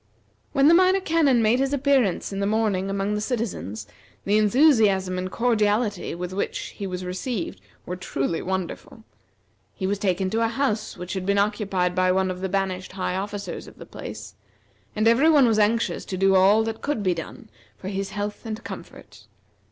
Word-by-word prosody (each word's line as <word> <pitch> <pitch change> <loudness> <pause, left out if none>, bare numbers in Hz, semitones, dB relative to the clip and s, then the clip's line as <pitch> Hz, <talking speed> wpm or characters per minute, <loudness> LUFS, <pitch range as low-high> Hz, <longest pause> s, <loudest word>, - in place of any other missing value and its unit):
When 275 +1 +4
the 325 - +7
Minor 370 +2 +5
Canon 310 -9 +2
made 225 +4 +3
his 270 +1 0
appearance 265 -9 +1
in 195 - -3
the 200 - 0
morning 205 -3 0
among 195 +1 -1
the 210 - -1
citizens, 200 - -3 0.4
the 205 +2 +3
enthusiasm 210 -6 +3
and 185 0 -3
cordiality 215 -5 0
with 180 +1 -5
which 200 - -3
he 200 - -5
was 185 0 -5
received 185 +2 -4 0.2
were 180 - -4
truly 165 -3 -2
wonderful. 190 +4 -5 0.7
He 190 - -4
was 200 +1 -1
taken 185 -1 0
to 225 - 0
a 230 - +3
house 225 -2 -2
which 180 +1 -6
had 190 -2 -3
been 200 0 +2
occupied 200 -3 0
by 185 0 +2
one 190 0 +1
of 180 0 -7
the 190 - -2
banished 185 -1 -2
high 185 -1 -2
officers 200 +1 -5
of - - -14
the - - -10
place, - - -9 0.6
and 215 +1 +2
every 250 +8 +5
one 290 -4 +6
was 225 -2 +2
anxious 225 +3 +1
to 185 - -4
do 195 +1 +3
all 195 +4 +5
that 225 0 -4
could 285 -8 -2
be 185 -2 +2
done 165 -2 -9 0.3
for 190 - -6
his 195 0 -3
health 205 0 -5
and 225 0 -6
comfort. - - -11
205 Hz, 190 wpm, -24 LUFS, 185-230 Hz, 0.7 s, the